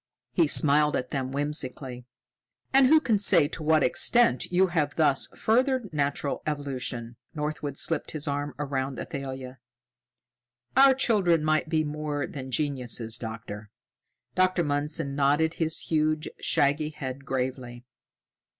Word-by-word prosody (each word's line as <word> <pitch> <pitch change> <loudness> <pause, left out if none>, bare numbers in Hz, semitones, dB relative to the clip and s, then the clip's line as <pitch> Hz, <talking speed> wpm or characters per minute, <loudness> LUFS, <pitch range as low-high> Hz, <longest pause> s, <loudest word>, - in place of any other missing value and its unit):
He 170 -3 +3
smiled 150 +1 +4
at 125 - -3
them 130 -2 -3
whimsically. 135 -3 -3 0.7
"And 270 -1 +6
who 315 +3 +6
can 225 -9 +1
say 175 -7 +5
to 160 - -6
what 155 -1 +3
extent 230 - +2
you 180 +2 +4
have 150 -4 0
thus 145 -4 +2
furthered 250 - +1
natural 140 -1 -2
evolution?" 130 -5 -4 0.2
Northwood 150 -2 -4
slipped 165 0 0
his 155 -1 -4
arm 145 -1 -3
around 135 -2 -3
Athalia. 135 -4 -7 1.2
"Our 270 0 +7
children 190 - +2
might 155 0 +1
be 160 -1 +1
more 150 -1 -3
than 130 -2 -8
geniuses, 125 -5 -1
Doctor!" 110 -2 -7 0.6
Dr. 185 -1 +2
Mundson 145 0 -1
nodded 145 +3 +2
his 160 -1 0
huge, 155 -1 0
shaggy 145 +2 +1
head 140 -3 -7
gravely. 125 -2 -4
145 Hz, 130 wpm, -27 LUFS, 135-160 Hz, 1.2 s, Our